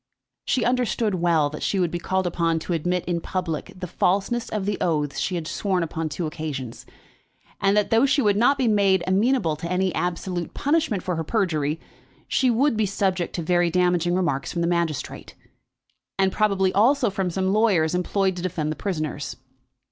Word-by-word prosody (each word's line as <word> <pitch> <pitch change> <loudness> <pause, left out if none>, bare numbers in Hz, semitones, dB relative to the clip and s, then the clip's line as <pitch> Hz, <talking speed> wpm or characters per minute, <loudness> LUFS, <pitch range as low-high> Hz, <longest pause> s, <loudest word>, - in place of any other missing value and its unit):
She 250 - +1
understood 240 -3 +1
well 165 -5 +2
that 150 - -7
she 195 - 0
would 175 -3 +1
be 175 - -3
called 190 +1 -1
upon 165 -1 0
to 175 - -3
admit 175 +2 -1
in 170 -1 -1
public 180 -1 -3
the 180 - -5
falseness 200 +7 0
of 210 -3 -2
the 205 0 -2
oaths 150 -5 0
she 185 - -1
had 170 -2 -3
sworn 185 +1 -1
upon 160 0 -3
two 160 +4 -3
occasions; 150 -7 -6 0.7
and 200 +1 +2
that, 210 - +1
though 230 +5 +4
she 275 +2 +2
would 210 -6 +3
not 245 +7 +3
be 260 -3 +1
made 200 -4 +3
amenable 195 - +2
to 170 +3 -5
any 185 0 +1
absolute 175 0 -3
punishment 290 - 0
for 180 -3 -2
her 165 - -1
perjury, 160 -6 0 0.5
she 260 - +2
would 245 +3 +2
be 215 -1 +1
subject 190 -2 -1
to 170 - -3
very 175 +1 +2
damaging 175 0 +2
remarks 165 -7 -1
from 170 - -2
the 170 - +1
magistrate, 170 -4 -2 0.8
and 190 -1 +2
probably 195 -3 +1
also 240 +2 +3
from 190 -1 -1
some 190 +2 0
lawyers 195 -8 +3
employed 190 +1 0
to 180 - -5
defend 165 -4 -2
the - - -3
prisoners. 155 -7 -3
180 Hz, 185 wpm, -24 LUFS, 170-205 Hz, 0.8 s, though